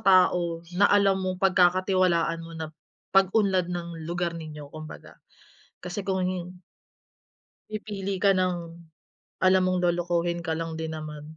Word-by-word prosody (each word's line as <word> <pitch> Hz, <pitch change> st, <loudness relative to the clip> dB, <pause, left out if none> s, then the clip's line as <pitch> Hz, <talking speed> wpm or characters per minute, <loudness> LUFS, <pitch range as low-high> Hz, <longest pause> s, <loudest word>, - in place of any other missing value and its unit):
tao 175 Hz, -3 st, +3 dB
na 205 Hz, +1 st, +5 dB
alam 195 Hz, -1 st, +4 dB
mong 185 Hz, 0 st, -2 dB
pagkakatiwalaan 185 Hz, -2 st, +3 dB
mo 165 Hz, 0 st, -10 dB
na 160 Hz, -1 st, -6 dB, 0.4 s
pag-unlad 195 Hz, -2 st, +3 dB
ng 170 Hz, -2 st, -5 dB
lugar 175 Hz, 0 st, -1 dB
ninyo 150 Hz, -3 st, -8 dB
kumbaga, 155 Hz, -1 st, -10 dB, 0.6 s
kasi 180 Hz, +3 st, -5 dB
kung 190 Hz, -1 st, 0 dB
hin 180 Hz, 0 st, -5 dB, 1.1 s
Pipili 205 Hz, -2 st, -4 dB
ka 200 Hz, -1 st, +6 dB
ng, 185 Hz, -1 st, +1 dB, 0.9 s
alam 185 Hz, 0 st, +5 dB
mong 185 Hz, -1 st, +1 dB
lolokohin 175 Hz, -1 st, 0 dB
ka 160 Hz, -, 0 dB
lang 165 Hz, -1 st, -4 dB
din 160 Hz, 0 st, -4 dB
naman, 150 Hz, -1 st, -7 dB
180 Hz, 130 wpm, -26 LUFS, 165-190 Hz, 1.1 s, ka